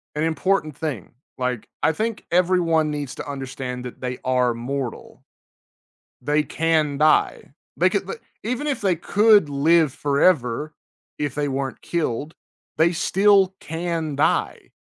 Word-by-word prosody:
an 150 - -1
important 160 -1 0
thing, 145 - -4 0.3
like, 125 -3 -2 0.2
I 160 - +4
think 220 +7 -3
everyone 170 -3 +2
needs 145 -3 -4
to - - -7
understand 130 -2 -5
that 125 - -8
they 125 -1 -4
are 125 -1 +2
mortal. 125 +2 -5 1.0
They 150 +3 +1
can 155 -1 0
die. 155 0 +2 0.2
They - - +4
can - - -1
the 460 - -6 0.2
even 250 +6 -2
if 285 - -1
they 190 -4 +2
could 205 0 +4
live 155 +2 +3
forever, 145 -1 +1 0.4
if 145 -3 -2
they 145 0 -1
weren't 135 -1 -3
killed, 155 -2 -3 0.4
they 165 +2 +4
still 195 +2 +3
can 165 -2 -3
die. 140 - 0
150 Hz, 135 wpm, -22 LUFS, 135-170 Hz, 1.0 s, I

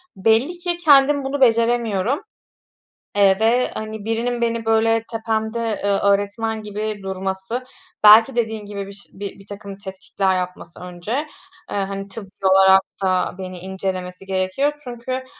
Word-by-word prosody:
belli 225 - +2
ki 350 -1 -2
kendim 285 -3 +5
bunu 270 +1 -3
beceremiyorum, 235 - +2 1.0
eee, 195 -1 +4
ve, 235 +3 +3
hani, 215 -1 -6
birinin 235 +2 -1
beni, 230 -1 -1
böyle, 225 0 +2
tepemde, 220 0 -2 0.3
eee, 200 -1 +2
öğretmen 205 +2 0
gibi 210 0 -4
durması, 190 +5 -4 0.4
belki 225 +4 +8
dediğin 220 -2 -1
gibi 200 -1 -6
bir 200 - -9
ş 200 0 -10
bi 200 0 -7
birtakım 200 0 -10
tetkikler 190 -1 -2
yapması 180 -2 -6
önce, 180 +4 -7 0.6
eee, - - -3
hani, 195 0 -3
tıbbi 195 -1 -9 0.2
olarak 190 0 +7 0.2
da 185 -1 +1
beni 185 -1 -6
incelemesi 185 0 -5
gerekiyor 190 +10 0
çünkü 255 +1 -5
210 Hz, 135 wpm, -21 LUFS, 190-230 Hz, 1.0 s, belki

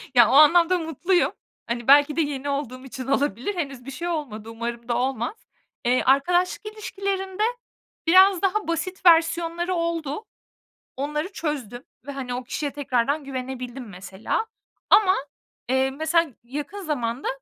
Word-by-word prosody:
Ya, 235 -3 +7
o - - +1
anlamda 335 +5 +6
mutluyum. 345 +3 +1 0.4
Hani, 235 0 -3
belki 290 +1 +6
de 330 - +2
yeni 285 -2 -3
olduğum 265 -2 -4
için 260 -1 -7
olabilir. 275 - 0
Henüz 275 -7 -4
bir 275 - -6
şey 340 +6 -5
olmadı. 240 -10 -4
Umarım 235 +1 -5
da 235 0 0
olmaz. 255 - -1 0.5
Eee, 250 +1 +3
arkadaşlık 350 +10 +2
ilişkilerinde 390 -1 -3 0.6
biraz 375 +2 +6
daha 400 +1 0
basit 365 +3 -3
versiyonları 335 +1 +3
oldu. 335 +2 -2 0.7
Onları 300 +7 -3
çözdüm 270 - -4 0.2
ve, 280 - -5
hani, 255 -3 -5
o 250 - -4
kişiye 285 +3 -3
tekrardan 280 +1 0
güvenebildim 255 -2 -6
mesela. 190 - -3 0.4
Ama, 400 -2 +6 0.5
eee, 265 +1 +2
mesela 315 +2 +1
yakın 290 +11 -6
zamanda 255 -6 -2
285 Hz, 140 wpm, -24 LUFS, 255-340 Hz, 0.7 s, Ya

